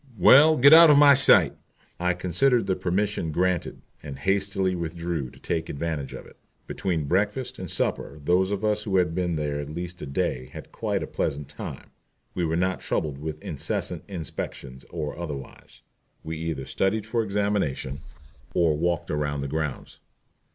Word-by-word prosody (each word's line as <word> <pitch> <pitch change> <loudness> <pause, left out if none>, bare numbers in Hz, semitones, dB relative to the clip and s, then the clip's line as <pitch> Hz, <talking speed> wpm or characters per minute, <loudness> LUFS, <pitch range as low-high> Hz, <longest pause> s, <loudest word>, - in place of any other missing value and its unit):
"Well, 150 - +7
get 140 +4 +8
out 165 0 +10
of 150 - +7
my 145 -1 +8
sight." 135 0 +5 0.5
I 90 0 +1
considered 95 +7 +2
the 95 -1 0
permission 95 -1 -1
granted, 90 +2 -1 0.2
and 70 -3 -8
hastily 95 -1 0
withdrew 85 -4 -3
to - - -17
take 80 -1 -3
advantage 75 -2 -4
of - - -9
it. - - -17 0.3
Between 85 -5 -2
breakfast 105 - -1
and 95 -2 -6
supper 75 -1 -2
those 90 +3 +3
of 100 +1 -2
us 105 0 +1
who 100 -3 0
had 90 -3 +2
been 90 -1 -1
there 75 -1 -2
at 75 0 -6
least 85 +3 -6
a - - -5
day 65 -2 -2
had - - -10
quite - - -2
a - - -3
pleasant 70 0 -3
time. - - -8 0.4
We 90 - -1
were 80 0 -1
not 95 +1 0
troubled 75 -3 -2
with 75 0 -6
incessant - - -2
inspections 70 -7 -6
or 75 -4 -4
otherwise. 75 -6 -8 0.4
We 80 +1 -5
either 80 -5 -4
studied 100 +7 0
for 115 +1 0
examination 100 -10 -1 0.6
or 85 -3 +3
walked 85 +2 -1
around 75 -1 -1
the 70 - -3
grounds. 75 -1 -4
85 Hz, 170 wpm, -25 LUFS, 75-100 Hz, 0.6 s, out